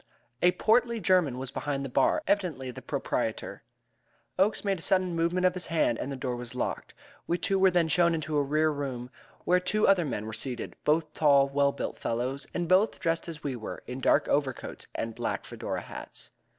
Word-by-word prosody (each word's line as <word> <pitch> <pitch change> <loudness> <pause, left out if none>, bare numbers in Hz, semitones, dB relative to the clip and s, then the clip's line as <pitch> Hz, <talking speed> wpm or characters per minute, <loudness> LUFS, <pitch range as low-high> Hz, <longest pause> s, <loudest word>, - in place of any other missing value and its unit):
A 180 0 +5
portly 235 +1 +2
German 180 - +2
was 130 0 -4
behind 140 -2 -3
the - - -2
bar, 310 - +2
evidently 170 - 0
the - - -9
proprietor. - - -3 0.8
Oakes 205 +2 +2
made 195 -3 +1
a - - -10
sudden 185 -1 +1
movement 170 +2 +1
of 180 - +4
his 180 -1 -5
hand, 160 -8 +1
and 140 - -3
the - - -3
door 125 -1 -3
was 120 0 -7
locked. 125 - -3 0.3
We 175 - +1
two 195 +2 +1
were 190 0 +6
then 175 -2 +2
shown 170 +2 +3
into 155 -1 -3
a 145 - +4
rear 155 +3 +2
room 130 -4 -4 0.3
where 180 +1 +4
two 200 +4 +1
other 195 -3 +5
men 110 -7 -3
were 110 - -6
seated 120 +2 -4
both 155 0 +2
tall, 140 -3 +4
well 140 0 +2
built - - -4
fellows, 125 +4 -2
and 175 -1 -2
both 185 +5 +3
dressed 165 0 -1
as 160 -3 -8
we 140 -3 -2
were, 110 -3 -7
in 125 +1 -6
dark - - +3
overcoats 140 -3 -2
and 115 0 -3
black - - -3
Fedora - - -4
hats. - - -10
155 Hz, 205 wpm, -28 LUFS, 135-180 Hz, 0.8 s, were